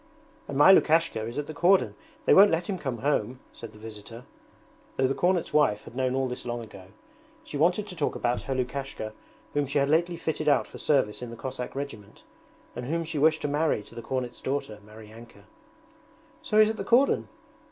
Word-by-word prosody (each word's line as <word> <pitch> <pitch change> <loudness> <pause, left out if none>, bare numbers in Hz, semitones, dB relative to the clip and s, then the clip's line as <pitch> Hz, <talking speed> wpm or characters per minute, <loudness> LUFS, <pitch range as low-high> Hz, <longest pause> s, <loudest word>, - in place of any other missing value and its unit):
'And 140 - -4
my 150 +6 +8
Lukashka 165 -9 +3
is 120 - -7
at 145 - -2
the 155 - -7
cordon; 180 +5 +3 0.3
they - - +5
won't 200 +2 +8
let 165 0 -1
him 190 -3 -3
come 130 -6 -3
home,' 125 -3 0
said 115 - -10
the 105 - -16
visitor, 110 +2 -10 0.7
though 130 - +2
the 130 - +1
cornet's 175 +2 0
wife 105 -9 +3
had - - -13
known 130 0 0
all 135 0 0
this 125 - -6
long 120 0 -4
ago. 100 -4 -12 0.6
She 155 - -9
wanted 175 +7 +2
to 185 - -8
talk 155 -4 -1
about 120 0 -1
her 135 - -3
Lukashka 130 -4 -4 0.4
whom 145 -1 0
she 140 +2 -1
had 140 0 +2
lately 170 +2 +2
fitted 155 -2 -1
out - - +3
for - - -12
service 130 -8 +1
in 125 - -6
the 115 - -8
Cossack 130 0 -6
regiment, 125 -8 -7 0.5
and 120 +1 -5
whom 165 +3 -1
she 160 -2 -4
wished 160 +2 +3
to - - 0
marry 145 -6 0
to - - -16
the 115 - -7
cornet's 125 0 -4
daughter, 130 -6 -3
Maryanka. 110 0 -14 1.0
'So 215 - -1
he's 215 0 +6
at 220 - -7
the - - -3
cordon?' 245 +6 +3
135 Hz, 205 wpm, -27 LUFS, 120-160 Hz, 1.0 s, my